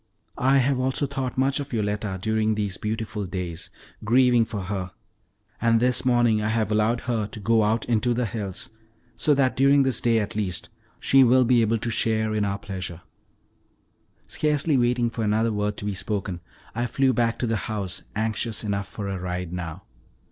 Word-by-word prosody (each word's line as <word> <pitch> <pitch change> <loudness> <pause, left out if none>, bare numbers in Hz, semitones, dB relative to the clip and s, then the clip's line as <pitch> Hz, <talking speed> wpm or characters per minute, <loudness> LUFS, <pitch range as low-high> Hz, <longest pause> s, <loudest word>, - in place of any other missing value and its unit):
I 135 +2 +4
have 135 0 +2
also 130 +3 +1
thought 135 -3 -4
much 135 +2 +2
of 145 0 -6
Yoletta 105 -3 -1
during 110 +1 +1
these 105 -2 -2
beautiful 105 -1 -4
days, 90 -3 -5 0.3
grieving 120 +1 +4
for 110 -3 -5
her, 95 -1 -4 0.7
and 115 0 +4
this 125 +1 +1
morning 120 -3 +3
I 105 - -1
have 110 -2 0
allowed 110 +3 +2
her 115 -4 -1
to 105 - -8
go 110 +2 +3
out 110 +1 +1
into 120 +1 +1
the 125 0 0
hills, 100 -3 -5 0.4
so 145 +5 +3
that 135 -2 +2
during 140 +1 +5
this 130 -2 +1
day, 115 -1 +3
at 105 -2 -2
least, 95 -5 -3 0.3
she 135 0 +5
will 130 +1 +5
be 120 0 +4
able 115 +1 +2
to 115 +1 -3
share 110 -1 0
in 105 -1 +1
our 100 0 -1
pleasure." 95 -4 -6 1.2
Scarcely 150 0 0
waiting 120 -1 +2
for 115 - -3
another 110 +2 +1
word 105 0 -1
to - - -5
be 105 - -1
spoken, 95 -2 -3 0.3
I 120 +2 -1
flew 130 +2 +2
back 115 0 +1
to - - -1
the 115 -1 0
house, 100 -4 -3
anxious 110 +1 -1
enough 100 -2 -2
for 100 -1 -6
a 95 -1 -3
ride 90 -1 -4
now. 90 +1 -5
110 Hz, 185 wpm, -25 LUFS, 100-120 Hz, 1.2 s, during